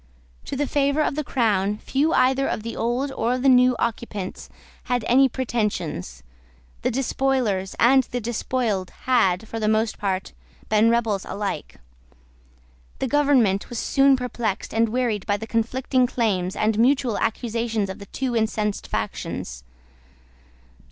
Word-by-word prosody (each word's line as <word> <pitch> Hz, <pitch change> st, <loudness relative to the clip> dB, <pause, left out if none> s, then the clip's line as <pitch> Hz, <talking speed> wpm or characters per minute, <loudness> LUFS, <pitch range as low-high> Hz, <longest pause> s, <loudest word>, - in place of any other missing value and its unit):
To -, -, -4 dB
the 290 Hz, +2 st, 0 dB
favour 280 Hz, +2 st, +1 dB
of -, -, 0 dB
the 305 Hz, +2 st, -2 dB
Crown 210 Hz, -6 st, +1 dB
few 285 Hz, +8 st, 0 dB
either 265 Hz, +1 st, +3 dB
of 215 Hz, -, -3 dB
the 230 Hz, -, -5 dB
old 245 Hz, +4 st, -1 dB
or 240 Hz, -2 st, 0 dB
of 255 Hz, -, -4 dB
the -, -, +3 dB
new 250 Hz, -1 st, +5 dB
occupants 220 Hz, -4 st, -4 dB, 0.4 s
had 245 Hz, -3 st, -1 dB
any 265 Hz, +2 st, +5 dB
pretensions. 205 Hz, -, -3 dB, 0.6 s
The -, -, +1 dB
despoilers 250 Hz, -6 st, 0 dB
and 265 Hz, +3 st, +5 dB
the 245 Hz, -, -4 dB
despoiled 225 Hz, -4 st, -2 dB
had, 220 Hz, -5 st, +2 dB
for 225 Hz, -, -5 dB
the 215 Hz, -, 0 dB
most 220 Hz, +1 st, +1 dB
part, 190 Hz, -2 st, -2 dB, 0.4 s
been 215 Hz, +1 st, +4 dB
rebels 225 Hz, -4 st, +1 dB
alike. 195 Hz, -, -4 dB, 1.2 s
The -, -, -2 dB
government 255 Hz, -8 st, +2 dB
was 240 Hz, -, -5 dB
soon 275 Hz, +3 st, +4 dB
perplexed 240 Hz, -5 st, -3 dB
and 225 Hz, 0 st, +2 dB
wearied 230 Hz, -4 st, -1 dB
by 205 Hz, -, +1 dB
the 220 Hz, -, -6 dB
conflicting 250 Hz, +3 st, 0 dB
claims 195 Hz, -7 st, -1 dB
and 215 Hz, 0 st, +1 dB
mutual 255 Hz, -2 st, +2 dB
accusations 225 Hz, -2 st, -1 dB
of 190 Hz, -, -7 dB
the 200 Hz, -, -10 dB
two 255 Hz, +1 st, -3 dB
incensed 215 Hz, -2 st, -1 dB
factions. -, -, -4 dB
230 Hz, 145 wpm, -23 LUFS, 210-255 Hz, 1.2 s, new